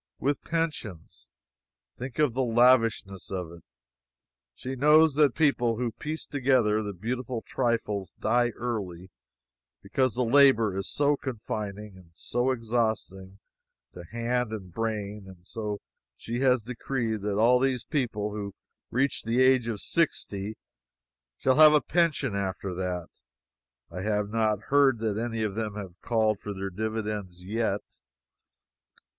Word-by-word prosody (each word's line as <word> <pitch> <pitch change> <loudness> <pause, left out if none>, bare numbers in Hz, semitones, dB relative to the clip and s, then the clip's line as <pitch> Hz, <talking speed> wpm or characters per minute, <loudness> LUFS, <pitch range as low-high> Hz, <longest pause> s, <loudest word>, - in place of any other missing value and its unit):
With 145 +1 -1
pensions! 150 - -4 0.7
Think 125 0 -7
of 150 -6 +2
the 130 - 0
lavishness 115 -5 +3
of 90 -3 -4
it. 85 -1 -13 0.9
She 130 - -5
knows 150 +3 +5
that 145 -3 +3
people 125 -7 +2
who 120 -1 -1
piece 155 +8 -5
together 125 -6 +2
the 105 -1 -4
beautiful 120 +4 -4
trifles 115 -6 -1
die 120 +2 +2
early, 95 -7 -4 0.7
because 130 -4 0
the 125 - +1
labor 115 -5 +5
is 95 +1 -3
so 145 0 +2
confining, 105 -6 -5
and 90 -3 -17
so 120 +9 -1
exhausting 110 -6 -2 0.6
to 90 - -9
hand 120 +3 -1
and 95 -5 -7
brain, 105 -2 -3
and 90 -2 -14
so 105 -1 -4 0.4
she 120 +1 -4
has 130 -3 +3
decreed 115 -2 -3
that 100 0 -1
all 120 +3 +5
these 130 -2 +1
people 115 -9 -2
who 100 -1 -5 0.3
reach 135 +2 0
the 115 +2 0
age 130 -2 +4
of 110 -3 -3
sixty 105 -10 -1 0.8
shall 130 +1 +2
have 155 -1 +9
a 150 - +6
pension 165 - +1
after 95 -1 -3
that! 90 -1 -3 0.8
I 90 +2 -5
have 105 0 -1
not 110 -2 +1
heard 140 -3 +5
that 110 -2 -1
any 115 -1 -2
of 105 -2 -1
them 110 -1 -3
have 100 -4 -7
called 110 -3 +1
for 105 -1 -6
their 95 0 -4
dividends 105 -3 -4
yet. 105 0 -1
115 Hz, 140 wpm, -27 LUFS, 100-130 Hz, 0.9 s, have